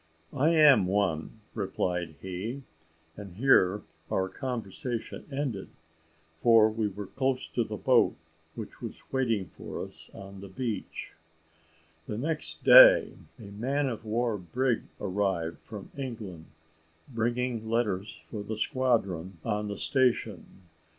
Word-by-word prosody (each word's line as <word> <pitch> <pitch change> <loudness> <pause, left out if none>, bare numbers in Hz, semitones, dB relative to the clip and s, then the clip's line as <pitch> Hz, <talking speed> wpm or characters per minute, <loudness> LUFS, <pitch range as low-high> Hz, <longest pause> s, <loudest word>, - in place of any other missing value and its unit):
"I 150 +5 +3
am 145 - +7
one," 95 0 -1
replied 90 -5 -2
he. 100 +9 -5 0.5
And 100 -4 -10
here 105 -5 +4 0.3
our 95 0 0
conversation 120 -1 -5
ended, 135 -8 -3 0.7
for 115 -1 +6
we 110 -1 -1
were 100 0 -6
close 130 +6 -1
to 120 - 0
the 110 -1 -6
boat, - - +3 0.4
which - - -8
was - - -7
waiting 115 -9 0
for - - -6
us - - -14
on 100 0 -10
the 100 - -8
beach. 110 +2 -5 0.9
The 105 - -4
next 155 +6 -2
day - - +9 0.2
a 115 - -12
man 135 +7 -1
of 115 -3 -4
war 115 0 -1
brig 120 +8 -1
arrived 95 -4 -1
from 105 -3 -10
England, 110 - -6 0.6
bringing 120 -1 -2
letters 105 -4 -1
for 105 - -4
the 110 +1 -5
squadron 100 -8 0
on 105 0 -1
the 100 - -4
station. 115 - 0
110 Hz, 125 wpm, -29 LUFS, 95-125 Hz, 0.9 s, day